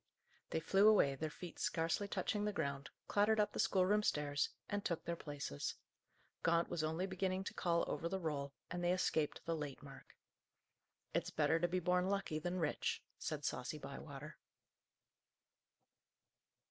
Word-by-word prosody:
They - - 0
flew 195 +6 +5
away, 200 -10 +6
their 155 +3 -3
feet 175 +3 -9
scarcely 165 +5 +1
touching 205 +2 -1
the 210 - +1
ground, 140 -7 -2 0.2
clattered 210 +2 +3
up 210 0 +2
the - - -4
schoolroom 195 +2 +4
stairs, 145 -7 +1 0.2
and 205 0 -2
took 170 -3 -2
their 170 - -1
places. 145 - -4 0.7
Gaunt 170 0 +3
was 160 - -1
only 160 +4 0
beginning 190 0 -1
to - - -5
call 170 -2 +2
over 170 - -1
the 190 - -1
roll, 145 -5 -2 0.2
and 175 0 -2
they 175 +1 +4
escaped 160 -4 0
the 165 - 0
"late" 150 -2 -5
mark. 135 -1 -12 1.0
"It's - - +1
better 165 - +2
to 175 - +2
be 185 +1 0
born 180 +1 +2
lucky 195 -6 0
than 175 +3 -2
rich," 160 -4 0 0.2
said 150 -2 -3
saucy 130 +4 -2
Bywater. 145 0 -8
170 Hz, 160 wpm, -38 LUFS, 150-190 Hz, 1.0 s, away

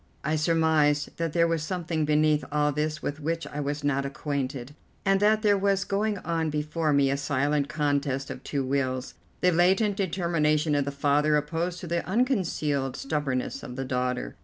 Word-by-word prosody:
I 155 +2 0
surmised 155 -2 +2
that 165 -2 -2
there 170 -1 +3
was 165 -1 0
something 165 -2 -2
beneath 150 0 +3
all 150 0 +2
this 155 +2 -2
with 145 +2 -3
which 165 +2 -2
I 150 - -6
was 145 +1 -3
not 140 -1 +1
acquainted, 140 -1 -4 0.3
and 195 0 +3
that 215 +2 +3
there 205 -2 +4
was 195 0 +2
going 205 +1 -1
on 165 -1 0
before 150 +1 -1
me 140 -1 +3
a 140 - 0
silent 145 +1 0
contest 145 -3 -1
of 125 - -8
two 140 -2 -2
wills, 130 -1 -1 0.3
the 180 - +4
latent 190 +4 +3
determination 165 -5 +1
of 145 -1 +1
the 140 - -2
father 145 +2 +2
opposed 165 +4 -2
to 175 - -6
the 170 0 -1
unconcealed 175 - 0
stubbornness 135 -3 -2
of 125 - -8
the 135 +1 -3
daughter. 125 -1 -2
150 Hz, 180 wpm, -27 LUFS, 140-170 Hz, 0.3 s, there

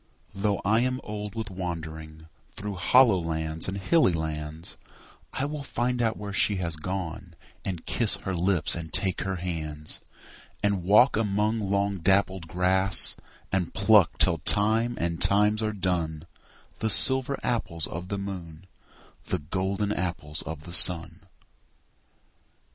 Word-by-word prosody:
Though 100 0 -1
I 110 +3 +3
am 130 +1 -1
old 105 0 -7
with 110 -3 -5
wandering 80 -3 -7 0.3
Through 105 0 -5
hollow 105 +3 +4
lands 80 -1 -2
and 95 +1 -4
hilly 100 - +2
lands, 80 0 -5 0.6
I 135 - -2
will 150 0 -5
find 125 -2 -2
out 110 -1 0
where 100 -1 -7
she 105 +1 +2
has 85 -4 -3
gone, 90 +2 -6 0.3
And 90 -4 -5
kiss 115 -4 0
her 95 - -5
lips 90 0 +2
and 80 -2 -5
take 95 +2 0
her 95 0 -3
hands; 80 -4 -4 0.6
And 100 -2 +1
walk 105 +9 +4
among 105 +1 0
long 100 0 -1
dappled 95 0 +1
grass, 95 +2 +3 0.4
And 95 -3 -2
pluck 100 -2 +4
till 85 -3 +3
time 110 +8 +3
and 85 -1 -3
times 105 +2 +4
are 110 0 -1
done 85 -6 -3 0.5
The 110 - -1
silver 130 +5 +6
apples 100 -10 -2
of 90 +2 -7
the 100 - -4
moon, 90 -4 -8 0.6
The - - -1
golden 95 +6 -3
apples 85 -5 -3
of 80 -1 -8
the 85 - -8
sun. 85 0 +5
95 Hz, 140 wpm, -26 LUFS, 85-105 Hz, 0.6 s, silver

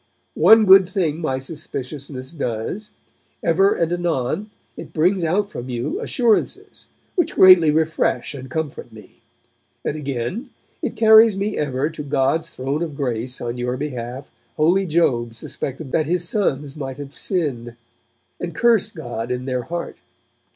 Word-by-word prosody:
One 220 -1 +8
good 190 -1 +7
thing 170 -5 -1
my 135 -5 -1
suspiciousness 135 -2 -6
does: 145 - -4 0.5
ever 195 +4 +3
and 170 0 0
anon 175 - -1 0.3
it - - -10
brings 180 +3 +2
out 200 +5 0
from 125 -7 -7
you 120 -1 -3
assurances, 235 -4 0 0.3
which 350 - 0
greatly 185 -4 +8
refresh 160 0 0
and 130 -2 -8
comfort 150 -5 -4
me. 110 -3 -16 0.6
And - - -1
again, 145 - -4 0.3
it - - -3
carries 220 -1 +6
me 205 +2 -2
ever 140 -1 -1
to 155 - -7
God's 145 +3 0
Throne 135 +3 -3
of 160 -4 -3
Grace 125 -2 -2
on 120 0 -4
your 125 +1 -2
behalf 130 -2 -5 0.3
Holy 180 +5 +3
Job 120 -8 +1
suspected 135 +4 -6
that 155 -2 +1
his 175 0 0
sons 145 -9 -1
might 135 -3 -6
have 140 -1 -9
sinned, 130 - -2 0.6
and 170 -2 -5
cursed 225 -2 +2
God 120 -6 -5
in 125 0 -3
their 130 -1 -1
heart. 170 0 -5
150 Hz, 145 wpm, -21 LUFS, 130-180 Hz, 0.6 s, One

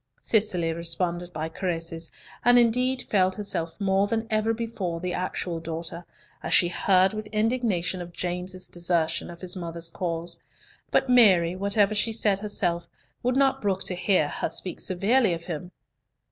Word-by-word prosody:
Cicely 185 -7 +1
responded 170 +1 -2
by 155 -1 -3
caresses, 165 -1 -3 0.3
and 245 +1 +6
indeed 250 +2 +3
felt 190 -2 +2
herself 170 -6 -3
more 195 0 +2
than 225 +1 -1
ever 215 +1 +2
before 220 -7 -3
the 180 +1 -3
actual 180 -2 -3
daughter, 165 +1 -5 0.4
as - - +1
she 175 - +4
heard 190 +2 +3
with 215 0 -5
indignation 215 -5 0
of 175 0 -8
James's 180 +1 -3
desertion 170 -2 0
of 170 -1 -11
his 185 0 +3
mother's 170 -2 -1
cause; 170 -1 -3 0.5
but - - +2
Mary, 190 -9 +5
whatever 200 +2 +2
she 215 +2 0
said 210 -3 +2
herself, 180 -5 -2 0.3
would 250 +1 +1
not 270 -1 +3
brook 195 -2 0
to - - +1
hear 180 -3 +2
her - - -3
speak 180 +2 -2
severely 200 +2 +2
of 165 0 -10
him. 175 0 -5
185 Hz, 160 wpm, -26 LUFS, 170-215 Hz, 0.5 s, and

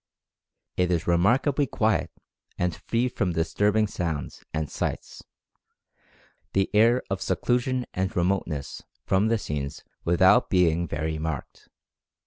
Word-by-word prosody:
It 90 -1 +2
is 85 -2 0
remarkably 125 - +2
quiet 110 -1 +1 0.5
and 90 -1 0
free 120 +8 -1
from 100 -7 -1
disturbing 105 +6 +2
sounds 85 -8 -4
and 80 -1 -2
sights, - - -4 1.3
the 95 0 +1
air 115 +4 +4
of 95 -1 -1
seclusion 125 +7 0
and 95 0 -1
remoteness 85 -6 -1 0.2
from 95 +3 +2
the 115 0 +2
scenes 70 -8 -5 0.2
without 95 +8 +4
being 85 -3 +2
very 80 +1 -3
marked. 80 -3 -5
95 Hz, 115 wpm, -26 LUFS, 80-110 Hz, 1.3 s, air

